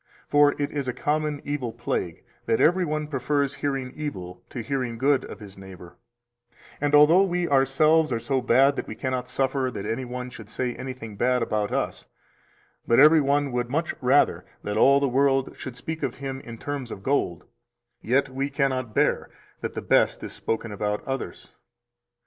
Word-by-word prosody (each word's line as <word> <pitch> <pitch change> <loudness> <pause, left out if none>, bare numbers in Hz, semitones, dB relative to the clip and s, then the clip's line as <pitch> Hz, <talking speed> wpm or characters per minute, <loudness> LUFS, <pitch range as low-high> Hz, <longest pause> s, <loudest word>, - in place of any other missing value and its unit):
For 145 0 +4
it 145 - -1
is 140 -3 -3
a 125 - -1
common 150 -1 -1
evil 140 -5 -2
plague - - -3 0.2
that 115 - +2
every 180 +3 +4
one 155 -2 -2
prefers 140 0 -1
hearing 135 -3 -3
evil 90 -12 -6
to 120 - -5
hearing 125 -1 -2
good 135 +3 +2
of - - -9
his 100 -2 -11
neighbor; 95 -2 -12 0.9
and 145 0 +3
although 155 +5 +7
we 180 -2 0
ourselves 150 +3 +3
are 120 - +1
so 130 +3 -1
bad 135 +3 +4
that - - -4
we - - -6
cannot 130 -2 -3
suffer 135 -1 0
that 100 - -6
any 115 +4 -2
one 125 0 -6
should 110 -3 -11
say 125 +1 -2
anything 125 -6 -7
bad 125 +1 +2
about 105 -2 -1
us, - - -2 0.8
but 115 - +4
every 155 +2 +7
one 140 0 +1
would 120 0 -2
much 160 +5 -1
rather 135 +3 +3 0.2
that 105 - -3
all 140 +5 +5
the 140 - +1
world 135 +1 +1
should 125 -1 -8
speak 160 +5 -5
of - - -2
him 135 -1 -5
in 115 -1 -9
terms 140 -1 -5
of 100 - -8
gold, 100 - 0 0.6
yet 130 +5 +2
we 135 +1 -3
cannot 130 -5 -1
bear - - +1 0.3
that - - -4
the - - -5
best - - +2
is - - -6
spoken 115 -1 -3
about 105 0 -2
others. 135 -1 -5
135 Hz, 185 wpm, -25 LUFS, 120-145 Hz, 0.9 s, although